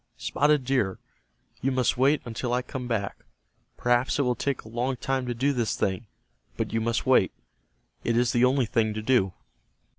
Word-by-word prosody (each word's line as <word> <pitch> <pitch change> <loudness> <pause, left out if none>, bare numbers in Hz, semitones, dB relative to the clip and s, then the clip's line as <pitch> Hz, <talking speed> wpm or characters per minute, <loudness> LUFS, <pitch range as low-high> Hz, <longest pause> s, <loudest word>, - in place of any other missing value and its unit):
Spotted 150 -1 +2
Deer, 125 -8 +1 0.6
you 135 - +1
must 130 -2 +1
wait 140 +4 +3
until 120 +1 -3
I 125 0 +1
come 125 -1 -6
back. 110 -5 -2 0.6
Perhaps 120 +1 +2
it 145 - +2
will 125 -1 +2
take 140 +2 -2
a - - -13
long 120 +4 -1
time 130 0 -1
to 120 - -2
do 140 +4 +1
this 120 -4 0
thing, 100 +4 -2 0.5
but - - -2
you 115 - +1
must 115 +1 -1
wait. 130 -8 +4 0.7
It 115 0 +1
is 120 0 +3
the 120 - +2
only 130 0 +3
thing 110 -2 0
to 110 - -4
do." 110 -7 +2
125 Hz, 185 wpm, -26 LUFS, 115-130 Hz, 0.7 s, wait